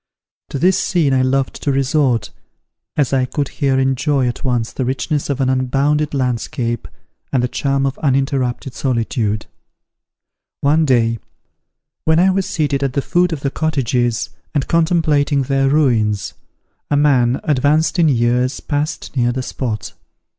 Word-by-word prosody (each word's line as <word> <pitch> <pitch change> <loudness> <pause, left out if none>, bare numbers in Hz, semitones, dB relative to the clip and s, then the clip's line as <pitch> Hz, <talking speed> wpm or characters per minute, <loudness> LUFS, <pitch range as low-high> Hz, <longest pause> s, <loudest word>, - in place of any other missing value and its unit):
To - - -4
this 180 +6 +3
scene 155 -7 +1
I 130 - +3
loved 130 0 0
to 145 - 0
resort, 135 -2 +1 0.7
as 140 -3 +1
I 130 -1 +2
could 140 +2 -3
here 135 -3 0
enjoy 135 0 +1
at 120 - -4
once 120 -4 0
the 130 - -2
richness 135 +4 -2
of 140 -1 -1
an 135 - +1
unbounded 140 +3 +1
landscape, 120 -2 -2 0.4
and 130 -3 +1
the - - +2
charm 135 +2 0
of 135 0 -3
uninterrupted 135 -2 0
solitude. 115 -5 -1 1.2
One 155 +3 +3
day, 115 -4 +2 0.9
when 160 0 +3
I 190 +2 +4
was 195 0 -1
seated 150 -8 -1
at 135 -2 -1
the 140 - -1
foot 180 0 +2
of 155 -4 -4
the 140 - -1
cottages, 125 -7 -1 0.2
and 140 - 0
contemplating 160 -4 +2
their 135 +1 +1
ruins, 115 -9 +1 0.6
a 145 - +2
man, 130 -4 +3
advanced 150 +4 +2
in 165 -2 +5
years, 125 0 +1
passed 150 0 -3
near 120 -2 +2
the 130 +1 -3
spot. 115 -5 -4
135 Hz, 150 wpm, -18 LUFS, 125-150 Hz, 1.2 s, in